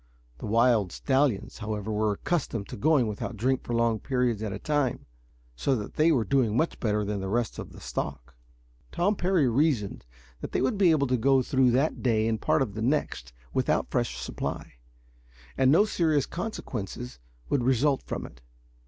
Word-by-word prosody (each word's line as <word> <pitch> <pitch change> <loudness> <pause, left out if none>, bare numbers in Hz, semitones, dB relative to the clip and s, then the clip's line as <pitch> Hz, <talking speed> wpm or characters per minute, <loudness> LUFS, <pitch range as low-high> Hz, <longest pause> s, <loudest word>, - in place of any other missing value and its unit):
The - - -6
wild 115 -3 +3
stallions, 130 -7 0
however, 110 -1 -4
were 105 0 +1
accustomed 115 - -2
to - - -6
going 145 +1 +3
without 110 +2 -4
drink 130 +4 +1
for 120 - -3
long 115 -1 +2
periods 125 -4 0
at 110 -2 -3
a - - -4
time, 145 -4 -1 0.5
so 65 - +1
that 105 -4 -5
they 160 +2 +3
were 130 -7 +2
doing 115 0 +1
much 160 - 0
better 105 -2 0
than 105 0 -2
the 95 - -4
rest 115 +2 -1
of - - -7
the - - -12
stock. 65 -2 -5 0.6
Tom 180 +5 +1
Parry 180 -6 +2
reasoned 120 - 0 0.3
that - - -7
they - - +1
would 130 +10 0
be 190 -3 +5
able 155 -4 +3
to 125 -1 +1
go 135 +2 +3
through 130 -1 +3
that 140 +5 +1
day 110 -3 +2
and 110 -1 -1
part 155 -2 +2
of 105 -6 -6
the 110 - -5
next 135 - -1 0.2
without - - 0
fresh 60 0 -1
supply, - - -5 0.8
and 130 - +3
that 155 - +6
no 210 - +5
serious 160 -9 +1
consequences 125 - -5 0.3
would 140 - +1
result 130 +2 +2
from - - -5
it. - - -14
125 Hz, 190 wpm, -27 LUFS, 110-145 Hz, 0.8 s, that